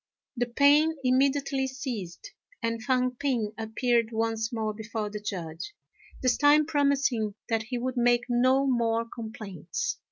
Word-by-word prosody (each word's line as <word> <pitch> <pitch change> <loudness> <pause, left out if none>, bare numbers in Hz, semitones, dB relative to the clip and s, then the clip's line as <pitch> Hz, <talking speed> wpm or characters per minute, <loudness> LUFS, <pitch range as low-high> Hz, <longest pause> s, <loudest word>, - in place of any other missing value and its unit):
The 245 -1 0
pain 290 +6 +4
immediately 270 +1 +2
ceased, 260 - -6 0.3
and 230 0 -1
Fang 255 0 +1
p'ing 245 -5 -1
appeared 230 +1 0
once 225 0 -1
more 220 -2 -2
before 220 -1 -4
the 210 - -5
Judge, 180 - -6 0.5
this 255 -1 +3
time 295 +1 +5
promising 275 -8 +1
that 225 -1 +1
he 250 - -2
would 255 +1 -3
make 240 0 +3
no 255 +2 +3
more 230 -3 +1
complaints. 220 - -5
240 Hz, 135 wpm, -27 LUFS, 220-270 Hz, 0.5 s, time